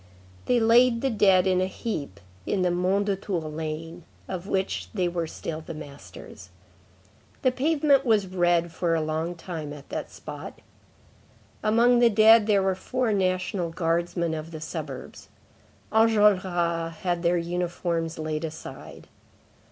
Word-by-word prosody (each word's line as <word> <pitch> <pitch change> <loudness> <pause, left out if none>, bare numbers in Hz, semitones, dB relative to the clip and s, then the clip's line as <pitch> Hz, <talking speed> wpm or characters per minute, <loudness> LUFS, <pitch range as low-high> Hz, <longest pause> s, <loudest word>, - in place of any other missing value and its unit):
They 245 -1 +3
laid 230 +1 +4
the 270 - 0
dead 195 -4 +4
in 185 -1 +2
a 185 - +1
heap 150 - -5 0.3
in 190 - 0
the 180 - +2
Mondétour 185 -3 -1
lane, 160 +2 -5 0.2
of 185 0 -5
which 190 -1 -1
they 185 -3 +1
were 170 -1 -2
still 160 0 -6
the 160 0 -8
masters. 145 -2 -11 0.9
The 255 - +4
pavement 285 0 +2
was 220 -5 +3
red 175 -2 +1
for 165 0 0
a 160 - 0
long 160 +3 -2
time 165 -3 -6
at 145 -1 -11
that - - -4
spot. - - -9 1.0
Among 235 +3 +4
the 240 -1 +6
dead 220 0 +6
there 200 -2 +3
were 190 0 +2
four 245 +4 -1
National 185 -2 0
Guardsmen 170 0 -1
of 155 0 -5
the 160 -2 -8
suburbs. 155 -4 -7 0.6
Enjolras 185 -7 +2
had 175 -2 -1
their 175 0 +2
uniforms 170 -1 -2
laid 155 0 -3
aside. 160 0 -8
180 Hz, 140 wpm, -26 LUFS, 165-210 Hz, 1.0 s, the